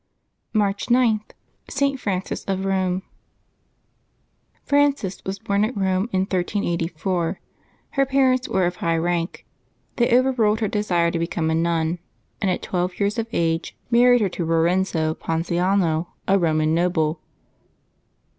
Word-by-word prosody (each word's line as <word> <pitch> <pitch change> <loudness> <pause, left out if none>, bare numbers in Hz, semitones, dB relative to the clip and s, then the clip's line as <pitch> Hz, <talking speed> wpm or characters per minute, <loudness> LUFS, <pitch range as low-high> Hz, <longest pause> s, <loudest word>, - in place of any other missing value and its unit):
March 205 -2 0
g.— 240 -3 +3 0.5
ST. 275 0 0
FRANCES 190 -5 -3
OF 195 0 -2
ROME. 190 -1 0 1.6
E - - -30
RANGES 285 -10 +1
was 190 +1 -2
born 200 +1 0
at 225 +4 -1
Eome 190 +2 0
in 185 - +1
1384. 175 -2 -1 0.5
Her 275 -1 +2
parents 260 -1 +2
were 190 -1 +2
of 175 +1 -2
high 165 0 0
rank. 170 +1 -2 0.5
They 240 - +3
overruled 240 -5 +2
her 215 - +2
desire 180 -5 +1
to 170 - -2
become 165 -1 -1
a - - +1
nun, 165 0 0 0.4
and 195 - +1
at 180 - -1
twelve 180 0 -2
years 205 +2 0
of 225 - -2
age 165 -2 -1
married 245 0 +5
her 200 - +2
to 175 - -4
Rorenzo 165 0 +1
Ponziano, 170 +1 0 0.2
a 195 +1 +4
Roman 155 -2 +2
noble. 165 -2 +1
185 Hz, 135 wpm, -23 LUFS, 170-210 Hz, 1.6 s, married